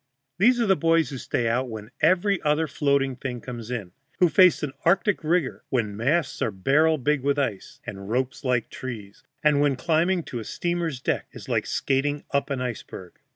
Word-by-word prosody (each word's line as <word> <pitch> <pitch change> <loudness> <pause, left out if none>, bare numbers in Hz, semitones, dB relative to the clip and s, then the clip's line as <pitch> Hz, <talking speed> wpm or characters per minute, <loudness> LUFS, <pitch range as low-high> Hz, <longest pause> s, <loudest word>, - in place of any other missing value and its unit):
These 245 +5 +5
are 235 - +2
the 195 -2 +4
boys 165 -4 +2
who 135 - -5
stay 120 -1 -1
out 125 +3 0
when 110 0 -8
every 185 +3 +3
other 150 +2 +2
floating 140 -2 +1
thing 125 -1 -5
comes 120 -2 -8
in, 110 -8 -4 0.3
who 180 - +4
face 180 +1 +5
an 140 -3 -3
Arctic 195 +4 +2
rigor 160 -3 0
when 110 -6 -1
masts 145 +10 0
are - - +2
barrel 140 +11 +2
big 145 +1 0
with 140 +1 +1
ice, 115 -9 -3
and 100 +1 -7
ropes 130 +4 -1
like 125 -4 0
trees, 110 -6 -8 0.2
and 150 -2 +4
when 145 -2 +3
climbing 170 +5 +1
to 120 - -6
a - - -5
steamer's 170 +1 -2
deck - - -2
is - - -10
like - - 0
skating 145 +2 0
up 140 +1 0
an 135 -2 -2
iceberg. 110 -7 -7
140 Hz, 195 wpm, -25 LUFS, 125-160 Hz, 0.3 s, These